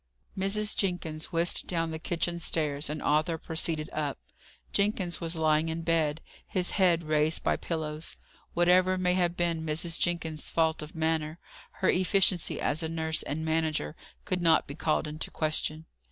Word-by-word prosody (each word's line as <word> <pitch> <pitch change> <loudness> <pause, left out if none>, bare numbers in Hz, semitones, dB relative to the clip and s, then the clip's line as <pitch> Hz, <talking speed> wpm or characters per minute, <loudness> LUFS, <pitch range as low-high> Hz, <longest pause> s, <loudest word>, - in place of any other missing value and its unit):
Mrs. 205 +2 0
Jenkins 175 -5 -2
whisked 170 0 +1
down 165 -2 0
the 160 - -4
kitchen 170 +1 -1
stairs, 150 -3 -1
and 150 0 -4
Arthur 155 +2 +2
proceeded 160 -1 -1
up. 150 -3 -2 0.6
Jenkins 200 -4 +1
was 165 0 0
lying 155 0 +2
in 165 +1 -3
bed, 160 -2 +1 0.3
his 180 -1 0
head 175 -4 +3
raised 155 0 +1
by - - +2
pillows. 155 -1 -3 0.4
Whatever 180 +2 +4
may 180 -1 +2
have 175 -1 +1
been 170 -2 0
Mrs. 160 +2 0
Jenkins's 160 -3 -1
faults 160 -1 +1
of 150 +2 -9
manner, 160 0 0 0.5
her - - +5
efficiency 185 -1 +2
as 155 +3 +1
a 160 - -2
nurse 160 -1 -1
and 160 +2 -3
manager 160 - 0 0.3
could 180 -1 -1
not 165 -1 +4
be 140 - -7
called 155 +1 0
into 155 +1 -4
question. 155 0 0
165 Hz, 160 wpm, -29 LUFS, 155-175 Hz, 0.6 s, her